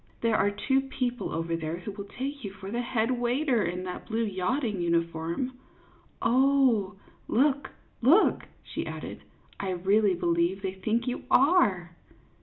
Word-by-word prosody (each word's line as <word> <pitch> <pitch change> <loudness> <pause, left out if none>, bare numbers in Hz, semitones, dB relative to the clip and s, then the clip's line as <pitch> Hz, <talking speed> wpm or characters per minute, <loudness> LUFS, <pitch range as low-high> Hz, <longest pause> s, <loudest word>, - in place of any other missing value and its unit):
There 230 -1 +2
are 205 - +3
two 265 +6 +1
people 250 -2 -3
over 165 +1 -2
there 160 0 -3
who 180 +4 -6
will 200 0 -7
take 280 +2 -4
you 200 - -3
for 195 +1 -8
the 240 +2 -1
head 235 0 0
waiter, 245 +1 +1
in 180 +2 -3
that 180 -1 -6
blue 225 +1 0
yachting 210 +1 -1
uniform. 170 +8 -1 0.6
Oh, 255 -6 +3 0.3
look, 275 +2 +2 0.3
look," 305 - +4 0.2
she - - -5
added, - - -7 0.2
" - - -29
I 195 - -2
really 195 +2 +2
believe 170 +3 0
they 190 -1 -2
think 215 +5 -1
you 250 - -3
are 205 - +3
215 Hz, 155 wpm, -28 LUFS, 180-255 Hz, 0.6 s, look